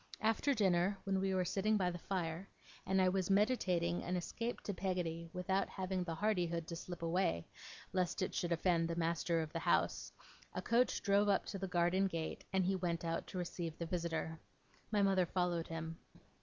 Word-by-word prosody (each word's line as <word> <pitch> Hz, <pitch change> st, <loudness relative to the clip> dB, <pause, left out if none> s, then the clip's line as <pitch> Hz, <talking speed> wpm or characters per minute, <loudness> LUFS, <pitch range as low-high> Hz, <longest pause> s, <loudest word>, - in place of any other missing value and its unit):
After 225 Hz, +6 st, +2 dB
dinner, 190 Hz, -2 st, +3 dB
when 195 Hz, -1 st, +1 dB
we 190 Hz, 0 st, +1 dB
were 185 Hz, -1 st, +2 dB
sitting 205 Hz, +4 st, +2 dB
by 180 Hz, -2 st, +1 dB
the 175 Hz, -, -6 dB
fire, 175 Hz, 0 st, -3 dB, 0.4 s
and 190 Hz, 0 st, +3 dB
I 185 Hz, -, +5 dB
was 185 Hz, 0 st, +1 dB
meditating 190 Hz, -5 st, +2 dB
an 180 Hz, -, -2 dB
escape 230 Hz, +7 st, -3 dB
to 205 Hz, -, -3 dB
Peggotty 175 Hz, -3 st, -2 dB
without 190 Hz, +2 st, 0 dB
having 185 Hz, -1 st, -2 dB
the 165 Hz, -2 st, -3 dB
hardihood 175 Hz, -4 st, 0 dB
to 170 Hz, -, -5 dB
slip 175 Hz, 0 st, -7 dB
away, 165 Hz, -, +1 dB, 0.5 s
lest 185 Hz, +1 st, +1 dB
it -, -, -2 dB
should 175 Hz, -, -1 dB
offend 170 Hz, 0 st, +2 dB
the 170 Hz, -, -2 dB
master 165 Hz, 0 st, +1 dB
of 155 Hz, -, -8 dB
the 165 Hz, -, -1 dB
house, -, -, +1 dB, 0.4 s
a -, -, 0 dB
coach 240 Hz, +2 st, +2 dB
drove 200 Hz, 0 st, +4 dB
up 200 Hz, -, +3 dB
to 195 Hz, -, -5 dB
the 195 Hz, -, -2 dB
garden 180 Hz, +2 st, +2 dB
gate 165 Hz, -3 st, -4 dB
and 190 Hz, -1 st, +2 dB
he 190 Hz, +1 st, +2 dB
went 170 Hz, -2 st, -1 dB
out 165 Hz, 0 st, -2 dB
to -, -, -6 dB
receive 170 Hz, -2 st, -4 dB
the 170 Hz, -, -3 dB
visitor. 165 Hz, -2 st, -2 dB, 0.5 s
My 210 Hz, -2 st, +2 dB
mother 190 Hz, -2 st, +3 dB
followed 175 Hz, -2 st, 0 dB
him. 165 Hz, 0 st, -5 dB
180 Hz, 195 wpm, -37 LUFS, 170-195 Hz, 0.5 s, I